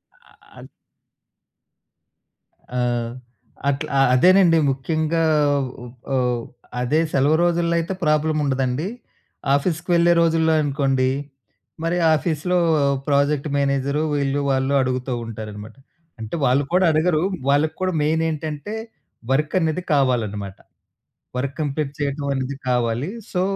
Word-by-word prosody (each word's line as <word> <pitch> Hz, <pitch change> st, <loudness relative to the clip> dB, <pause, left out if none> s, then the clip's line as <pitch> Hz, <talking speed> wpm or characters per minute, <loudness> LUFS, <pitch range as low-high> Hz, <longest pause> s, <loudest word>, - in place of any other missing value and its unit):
అ -, -, -26 dB, 0.3 s
అద్ -, -, -11 dB, 2.1 s
ఆ! -, -, +1 dB, 0.9 s
అట్ల 140 Hz, 0 st, -2 dB, 0.3 s
అదేనండి 180 Hz, +5 st, +5 dB
ముఖ్యంగా 160 Hz, +4 st, -1 dB, 0.6 s
ఉ -, -, -8 dB, 0.3 s
ఓహ్, 125 Hz, -2 st, 0 dB, 0.4 s
అదే 150 Hz, +6 st, +1 dB
సెలవు 145 Hz, +4 st, +3 dB
రోజుల్లో 170 Hz, -1 st, +1 dB
అయితే 170 Hz, +3 st, -3 dB
ప్రాబ్లమ్ 155 Hz, 0 st, +2 dB
ఉండదండి. 135 Hz, +4 st, -1 dB, 0.7 s
ఆఫీస్‌కి 165 Hz, +5 st, -1 dB
వెళ్ళే 170 Hz, 0 st, +5 dB
రోజుల్లో 160 Hz, -1 st, +3 dB
అనుకోండి, 135 Hz, -3 st, +1 dB, 0.7 s
మరి 170 Hz, +2 st, 0 dB, 0.2 s
ఆఫీస్‌లో 170 Hz, +3 st, -1 dB, 0.5 s
ప్రాజెక్ట్ 145 Hz, +1 st, +1 dB
మేనేజరు 140 Hz, +1 st, 0 dB
వీళ్ళు 140 Hz, 0 st, 0 dB
వాళ్ళు 135 Hz, +1 st, +1 dB
అడుగుతా 130 Hz, 0 st, -2 dB
ఉంటారనమాట. 110 Hz, -1 st, -8 dB, 0.4 s
అంటే 110 Hz, +4 st, -5 dB
వాళ్ళు 130 Hz, +3 st, +3 dB
కూడా 185 Hz, +1 st, +4 dB
అడగరు 155 Hz, +1 st, +2 dB, 0.3 s
వాళ్ళకి 155 Hz, +3 st, +2 dB
కూడా 185 Hz, -, +1 dB
మెయిన్ 160 Hz, +2 st, +1 dB
ఏంటంటే 155 Hz, +5 st, -5 dB, 0.6 s
వర్కనేది 155 Hz, +4 st, +1 dB
కావాలనమాట. 110 Hz, -8 st, 0 dB, 0.8 s
వర్క్ 135 Hz, +2 st, -3 dB
కంప్లీట్ 145 Hz, -1 st, -2 dB
చేయటం 140 Hz, 0 st, -2 dB
అనేది 135 Hz, +1 st, -3 dB
కావాలి. 125 Hz, +4 st, 0 dB, 0.2 s
సో, 180 Hz, -, 0 dB
145 Hz, 105 wpm, -22 LUFS, 130-160 Hz, 2.1 s, అదేనండి